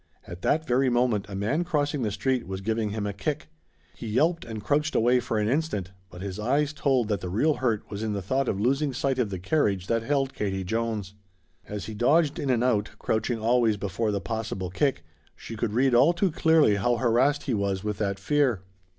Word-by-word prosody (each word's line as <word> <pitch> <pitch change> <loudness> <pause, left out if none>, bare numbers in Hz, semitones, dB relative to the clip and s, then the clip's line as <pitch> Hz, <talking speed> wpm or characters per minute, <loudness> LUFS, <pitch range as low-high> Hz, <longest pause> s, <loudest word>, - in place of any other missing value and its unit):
At 85 +1 -9
that 160 +1 +1
very 130 0 +2
moment 120 -5 +1
a 100 - -6
man 115 - 0
crossing 150 -4 -1
the 110 - 0
street 120 +5 -1
was 95 0 -5
giving 110 +1 -1
him 105 0 -3
a 100 - -2
kick. 150 +11 -3 0.5
He 115 - -7
yelped 160 +10 +1
and 110 -3 -7
crouched 150 +5 0
away 120 +2 +4
for 115 -2 -2
an 105 0 +1
instant, 125 - -1 0.2
but 90 +1 -9
his 100 0 -5
eyes 140 +7 +1
told 135 -6 +1
that 105 -3 -1
the 90 - -4
real 130 - +2
hurt 115 -5 -1
was 100 0 -5
in 110 -1 -2
the 100 - -2
thought 130 +7 0
of 95 - -1
losing 135 +5 +1
sight 135 0 -1
of 115 -4 +1
the 95 - -4
carriage 95 - 0
that 115 +3 0
held 135 +2 0
Katie 95 -2 -2
Jones. 110 -1 -2 0.5
As 105 -1 -5
he 110 - -6
dodged 145 +7 +2
in 140 - -2
and 120 -2 +2
out, 110 -5 +1
crouching 110 +2 -1
always 115 -1 +2
before 100 +3 -2
the 100 - -1
possible 95 -2 -4
kick, 135 - 0 0.3
she 115 - -9
could 110 -1 -2
read 130 +2 +3
all 135 +8 +5
too 175 +1 +1
clearly 160 -9 +4
how 120 +5 +1
harassed 130 +5 +2
he 130 - -2
was 100 -2 -1
with 105 -1 -3
that 100 -2 -1
fear. 125 -2 +1
115 Hz, 220 wpm, -26 LUFS, 100-135 Hz, 0.5 s, all